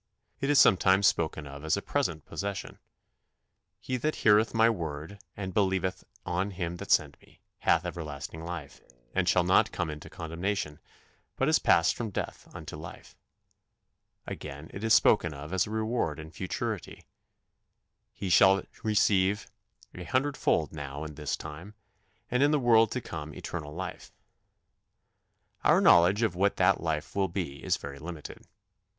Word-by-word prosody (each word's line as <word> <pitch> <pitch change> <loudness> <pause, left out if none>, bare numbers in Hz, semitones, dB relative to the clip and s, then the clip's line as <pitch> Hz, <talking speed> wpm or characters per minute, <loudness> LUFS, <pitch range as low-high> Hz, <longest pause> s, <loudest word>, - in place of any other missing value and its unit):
It 140 - -1
is 145 - +4
sometimes 95 -1 +5
spoken 80 -3 +1
of 70 +1 -9
as 80 +4 +1
a - - -3
present 85 - -1
possession: 100 -1 -5 1.0
"He 130 +3 -3
that 155 +5 -1
heareth 110 +1 +5
my 115 0 +4
word, 80 -2 -3 0.2
and 95 -2 -5
believeth 95 -2 0 0.2
on 95 +3 -1
him 90 -3 -4
that - - -8
sent - - +2
me, - - -23 0.2
hath 85 +2 +2
everlasting 80 -2 -6
life, 85 -4 -7 0.3
and - - +1
shall - - +4
not - - +4
come 85 -3 -2
into 75 0 -9
condemnation; 85 -1 -3 0.6
but - - 0
is - - +4
passed 85 +1 +4
from 115 -2 -4
death 100 - -5
unto - - -8
life." 80 +1 -10 1.1
Again 75 +1 -8
it 100 - -7
is 110 -1 +5
spoken 85 -8 +4
of 75 +5 -8
as 95 +1 +1
a - - -8
reward 110 -7 -1
in 80 0 -9
futurity: 95 +2 -5 1.1
"He 100 - -6
shall 95 +2 +6 0.2
receive 105 -2 +2 0.4
an 90 - -8
hundredfold 130 - 0
now 70 -1 -6
in 75 -1 -7
this 75 0 -3
time... 80 +7 -9 0.6
and 125 +2 +2
in 145 - +5
the 150 - +3
world 115 -3 +5
to 125 - -2
come 75 -6 -7
eternal 75 -4 -6
life." 95 +2 -6 1.5
Our - - +5
knowledge 90 +6 +5
of 110 - +1
what 100 +3 +2
that - - +3
life 80 -2 -3
will 100 -1 +2
be 85 -6 -5
is - - +1
very 70 0 -8
limited. 80 0 -9
90 Hz, 155 wpm, -29 LUFS, 80-105 Hz, 1.5 s, shall